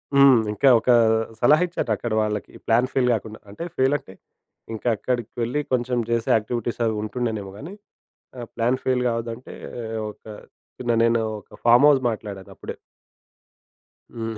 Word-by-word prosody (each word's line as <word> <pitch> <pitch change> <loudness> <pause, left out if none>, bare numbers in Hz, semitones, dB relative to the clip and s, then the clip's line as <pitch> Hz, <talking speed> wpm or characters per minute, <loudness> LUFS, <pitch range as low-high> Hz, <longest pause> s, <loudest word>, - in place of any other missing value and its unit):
హ్మ్. 140 -4 +7
ఇంకా 135 +6 +3
ఒక 115 - -4 0.5
సలహా 150 +7 +5
ఇచ్చారు 170 -9 -3
అక్కడి 110 +1 -3
వాళ్ళకి 105 -2 -3 0.2
ప్లాన్ 120 +3 +3
ఫెయిల్ 125 -2 +2
కాకుండా. 110 0 -5
అంటే 105 +11 -7
ఫెయిల్ 135 +2 +3
అంటే, 135 -10 -15 0.6
ఇంకా 110 +2 -5
అక్కడికెళ్లి 120 +3 -2
కొంచెం 125 0 0
చేసే 115 -1 0
యాక్టివిటీస్ 115 +2 -2
అవి 110 -1 0
ఉంటుండెనేమో 110 -3 -3
గాని, 160 - -8 0.7
ఆహ్, 120 -2 -7
ప్లాన్ 120 +3 +1
ఫెయిల్ 130 -1 +1
కావద్దంటే, 115 +1 -4 0.6
ఒక - - -17 0.6
చిన్న 120 -1 0
నేను 115 0 +2 0.2
ఒక - - -17
ఫార్మ్‌‌ 120 +4 +6
హౌస్ 135 -3 +3
మాట్లాడానప్పుడే. 100 -3 -8 1.4
హ్మ్. 115 -1 -4
120 Hz, 140 wpm, -23 LUFS, 110-130 Hz, 1.4 s, హ్మ్